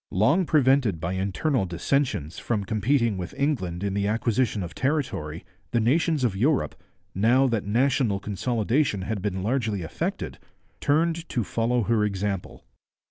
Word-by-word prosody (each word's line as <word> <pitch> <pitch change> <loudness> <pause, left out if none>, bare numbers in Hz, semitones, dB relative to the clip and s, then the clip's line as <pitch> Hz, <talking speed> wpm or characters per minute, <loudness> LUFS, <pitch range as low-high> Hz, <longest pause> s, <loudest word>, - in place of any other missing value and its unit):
Long 145 - +2
prevented 130 - +3
by 85 +3 -2
internal 100 - 0
dissensions 90 - -1
from 110 -4 -1
competing 115 0 +1
with 90 - -6
England 100 - -1
in 100 -1 -1
the 100 0 0
acquisition 110 -1 0
of 85 - -7
territory, 130 - -2 0.2
the 120 - +1
nations 150 +5 +2
of 115 -6 +1
Europe, 135 +8 +1 0.4
now 120 +7 +4
that 115 -6 0
national 120 -2 +2
consolidation 110 +2 0
had 110 0 -3
been 95 -2 -2
largely 110 -5 -1
effected, 80 - -4 0.4
turned 165 +3 +1
to 120 - 0
follow 115 +3 0
her 110 0 +2
example. 100 -2 -3
115 Hz, 140 wpm, -25 LUFS, 100-135 Hz, 0.4 s, now